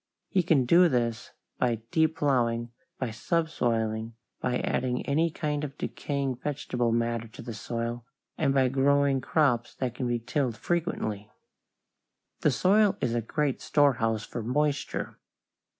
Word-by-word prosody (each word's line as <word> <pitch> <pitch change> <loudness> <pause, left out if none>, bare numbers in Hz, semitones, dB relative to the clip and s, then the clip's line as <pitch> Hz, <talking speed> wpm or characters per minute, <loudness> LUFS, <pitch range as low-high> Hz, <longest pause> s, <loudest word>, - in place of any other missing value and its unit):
He 190 - +3
can 160 -7 +3
do 175 +7 +6
this 120 -4 -1 0.3
by 115 -3 0
deep 160 0 +2
plowing, 120 -4 +1 0.3
by 130 -4 -2
subsoiling, 115 -6 -1 0.2
by 125 -1 0
adding 125 -1 -1
any 160 +4 +2
kind 150 -1 -2
of 140 0 -5
decaying 140 -3 -2
vegetable 125 -4 -1
matter 115 0 0
to 110 - -11
the 120 - -6
soil, 115 +3 -4 0.3
and 140 -3 +1
by 135 -1 +3
growing 140 0 +3
crops 125 -5 +1
that 125 -3 -2
can 125 0 -3
be 120 0 +1
tilled 125 0 -1
frequently. 110 - -2 1.1
The - - +3
soil 195 - +3
is 115 - 0
a 120 - +1
great 140 +4 -1
storehouse 125 -8 +2
for 120 - -5
moisture. 145 +5 -1
130 Hz, 140 wpm, -28 LUFS, 115-150 Hz, 1.1 s, do